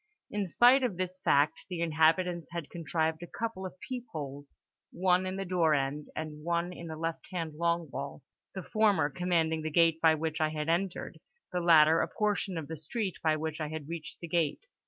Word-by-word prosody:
In 205 -2 -1
spite 245 - +6
of 235 -9 -1
this 185 0 -3
fact, 145 -4 +2
the 180 -2 -4
inhabitants 165 +1 +2
had 170 -3 -5
contrived 160 -1 -1
a 175 - -7
couple 220 -4 -4
of 185 - -14
peep 250 -2 -5
holes—one 160 +5 -2
in 185 - -3
the 195 0 -3
door 170 -4 +3
end 140 +2 -2
and 150 -1 -5
one 170 +1 -1
in 170 -1 -8
the 160 - -5
left 165 +1 -4
hand 165 -4 -3
long 170 +1 0
wall; 140 0 -6 0.3
the 190 - -4
former 200 -10 +2
commanding 165 -2 +1
the 155 - -2
gate 165 0 +3
by 160 -1 +6
which 155 0 -2
I 155 - +3
had 155 0 -3
entered, 175 +2 -1 0.3
the 180 -1 -1
latter 160 -1 +6
a - - 0
portion 205 -3 -1
of 155 -3 -4
the 160 - -6
street 190 +6 -3
by 155 -1 +2
which 155 +1 -4
I 155 - -1
had 155 -2 -6
reached 165 -2 -7
the 170 - -5
gate. 165 - 0
165 Hz, 200 wpm, -30 LUFS, 155-180 Hz, 0.3 s, spite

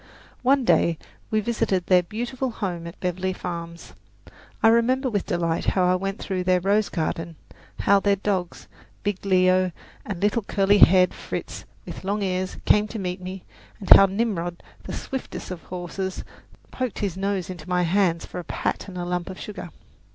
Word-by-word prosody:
One 265 +1 +3
day 170 -7 +3 0.3
we 215 0 +1
visited 210 -5 0
their 180 -1 +5
beautiful 240 +8 -3
home 180 -7 -4
at 170 - -10
Beverly 185 +1 -1
Farms. 170 -2 -7 0.7
I 225 - +8
remember 250 +3 +3
with 205 -3 -1
delight 170 -2 0
how 185 - +4
I 180 0 +4
went 195 +2 -2
through 185 -2 -3
their 185 0 +3
rose 200 +3 +2
garden, 165 0 -3 0.5
how 200 0 +5
their 200 0 +2
dogs, 190 -3 -2 0.4
big 200 -2 -2
Leo 185 -1 +3 0.3
and 195 -5 -5
little 205 +4 +2
curly 200 0 +2
haired 185 0 +6
Fritz - - -6 0.2
with - - -8
long 200 +2 -1
ears, 185 -1 -2
came 210 0 +4
to 225 - -6
meet 185 -2 -3
me, 185 0 -7 0.4
and 195 - -7
how 195 - +7
Nimrod, 190 -4 -2 0.2
the - - -6
swiftest 265 -7 -5
of 180 -2 -6
the - - -22
horses, 185 +1 -4 0.5
poked 255 -3 -3
his 195 -4 -2
nose 195 -1 -2
into 180 -1 -10
my 180 0 +2
hands 175 -1 +2
for - - -7
a - - -5
pat - - -3
and 185 -2 -8
a 175 - -3
lump 180 0 -2
of 185 - -8
sugar. 200 -4 -7
190 Hz, 180 wpm, -24 LUFS, 180-205 Hz, 0.7 s, I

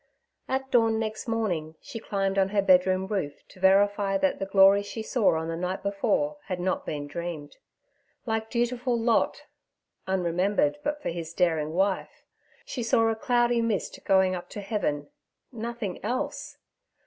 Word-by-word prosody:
At 265 0 -2
dawn 225 -2 +4
next 220 +1 -3
morning 180 -9 -1
she 225 - -8
climbed 195 -2 -1
on 190 0 +3
her 200 0 +1
bedroom 185 0 +4
roof 190 -8 -4
to 190 - -16
verify 195 +1 +3
that 190 -1 0
the 195 - -3
glories 195 +1 +5
she 220 +2 -5
saw 220 -6 +2
on 160 0 -3
the 165 - -3
night 180 +3 -3
before 205 +9 0
had 185 -3 -4
not 185 +1 -1
been 145 -2 -3
dreamed. 155 -1 -6 0.7
Like 220 -1 -2
dutiful 240 0 0
Lot 230 0 +1 0.6
[unremembered 180 -4 +1
but 295 0 -2
for - - -1
his 165 -1 -6
daring 160 -4 +1
wife], 190 +2 -1 0.4
she 260 - -5
saw 225 0 +3
a 225 - 0
cloudy 240 +1 +2
mist 225 -3 -2
going 190 -1 +3
up 180 -1 -6
to 205 - -6
heaven—nothing 210 - -5
else! 245 +5 -3
195 Hz, 155 wpm, -27 LUFS, 180-225 Hz, 0.7 s, glories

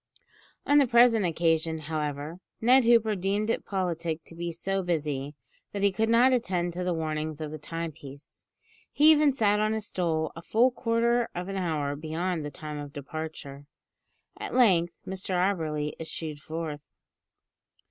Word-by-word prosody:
On 290 0 +5
the 275 - +4
present 235 -4 +5
occasion, 165 -1 +1
however, 150 +1 -4 0.2
Ned 250 +2 +5
Hooper 230 -2 +4
deemed 200 +4 0
it - - -2
politic 170 -4 -2
to - - -10
be 170 +1 -4
so 195 +4 -2
busy, 150 -5 -2 0.4
that 200 -1 -3
he 200 - +4
could 220 +4 0
not 245 +3 +5
attend 180 -7 0
to 180 +1 -3
the 180 - 0
warnings 155 -2 -3
of 155 -1 -5
the 155 - -7
timepiece. 150 -3 -8 0.5
He 305 +2 +6
even 300 -2 +5
sat 210 -5 +2
on 215 +1 +1
his 220 -1 -3
stool 160 -6 -1
a 165 - -8
full 235 +8 +3
quarter 235 0 +1
of 180 +2 -4
an 195 - -4
hour 155 -6 -1
beyond 160 +2 -3
the 145 - -4
time 150 0 -7
of 145 -1 -8
departure. 145 -1 -7 0.7
At - - -5
length, 180 -9 +4
Mr 190 0 -4
Auberly 160 -5 0
issued 160 -2 -5
forth. 155 -1 -5
170 Hz, 160 wpm, -28 LUFS, 155-215 Hz, 0.7 s, He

